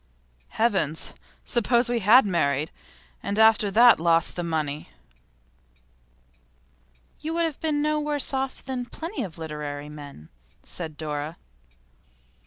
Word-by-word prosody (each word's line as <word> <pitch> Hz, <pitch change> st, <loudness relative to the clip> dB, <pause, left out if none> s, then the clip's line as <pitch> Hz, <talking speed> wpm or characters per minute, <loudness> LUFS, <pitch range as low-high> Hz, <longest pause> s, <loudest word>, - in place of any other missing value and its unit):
Heavens! 190 Hz, -9 st, 0 dB, 0.3 s
Suppose 240 Hz, +1 st, +2 dB
we 240 Hz, -1 st, 0 dB
had 225 Hz, +5 st, +6 dB
married, 155 Hz, -5 st, 0 dB, 0.5 s
and 200 Hz, +1 st, -3 dB
after 220 Hz, -1 st, +5 dB
that 235 Hz, +2 st, +6 dB
lost 165 Hz, 0 st, +2 dB
the 175 Hz, -, -3 dB
money!' 155 Hz, -3 st, -3 dB, 2.3 s
'You 320 Hz, +2 st, -4 dB
would 335 Hz, 0 st, +2 dB
have 315 Hz, -4 st, -4 dB
been 300 Hz, -2 st, 0 dB
no 305 Hz, 0 st, +1 dB
worse 295 Hz, -2 st, -1 dB
off 265 Hz, 0 st, -2 dB
than 255 Hz, -2 st, -3 dB
plenty 330 Hz, -, -6 dB
of 180 Hz, -8 st, -6 dB
literary 150 Hz, -2 st, -6 dB
men,' 145 Hz, -, -11 dB, 0.3 s
said 160 Hz, -4 st, -6 dB
Dora. 150 Hz, +1 st, -4 dB
200 Hz, 120 wpm, -25 LUFS, 155-255 Hz, 2.3 s, had